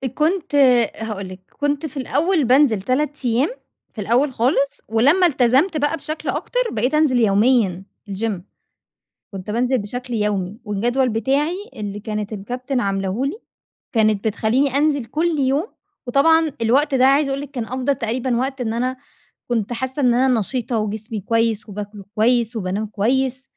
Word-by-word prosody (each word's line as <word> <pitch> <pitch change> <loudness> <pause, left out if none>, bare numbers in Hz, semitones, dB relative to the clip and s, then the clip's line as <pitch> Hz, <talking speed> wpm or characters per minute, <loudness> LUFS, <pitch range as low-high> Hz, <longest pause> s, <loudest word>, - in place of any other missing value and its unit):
كنت 320 0 0
آآ، 250 -5 +5
هاقول 205 -3 -5
لِك، 185 0 -9 0.2
كنت 290 +1 0
في 295 -2 -7
الأول 300 +5 +1
بانزل 250 -5 +4
3 280 +4 -1
أيام 245 +5 +2 0.4
في 215 - -6
الأول 250 +7 +2
خالص، 270 +4 0
ولما 285 +12 +4
التزمت 275 +4 +2
بقى 295 +2 0
بشكل 310 0 -5
أكتر - - -2
بقيت 245 +6 -1
أنزل 300 -5 +3
يوميًا 210 -3 +3 0.3
الgym. 200 -1 -3 0.9
كنت 195 +1 -6
بانزل 250 +4 +1
بشكل 245 +4 -5
يومي، 210 -2 -1
والجدول 240 +6 0
بتاعي 275 - 0 0.2
اللي 205 -1 -5
كانت 210 0 -4
الكابتن 250 +6 -3
عاملاه 195 0 -1
لي 290 +10 -3 0.6
كانت 215 -1 +2
بتخليني 245 +6 +1
أنزل 285 -3 +1
كل 315 +6 -1
يوم، 275 +7 +1 0.4
وطبعًا 320 +5 +4
الوقت 270 +5 +2
ده 260 0 +4
عايزة 275 +2 +4
أقول 270 +1 -2
لك 285 -1 -8
كان 245 -5 -4
أفضل 260 +3 -1
تقريبًا 240 +1 -1
وقت 265 +1 -2
إن 225 -2 -1
أنا 255 +2 -1 0.5
كنت 235 -2 -1
حاسة 260 +4 -3
إن 245 -2 +4
أنا 250 -1 +3
نشيطة، 240 +2 -2
وجسمي 215 +1 -4
كويس، 225 +1 0
وباكل 205 0 -7
كويس، 235 +1 +2
وبانام 200 +2 -2
كويس، 255 +5 0
245 Hz, 155 wpm, -21 LUFS, 215-275 Hz, 0.9 s, آآ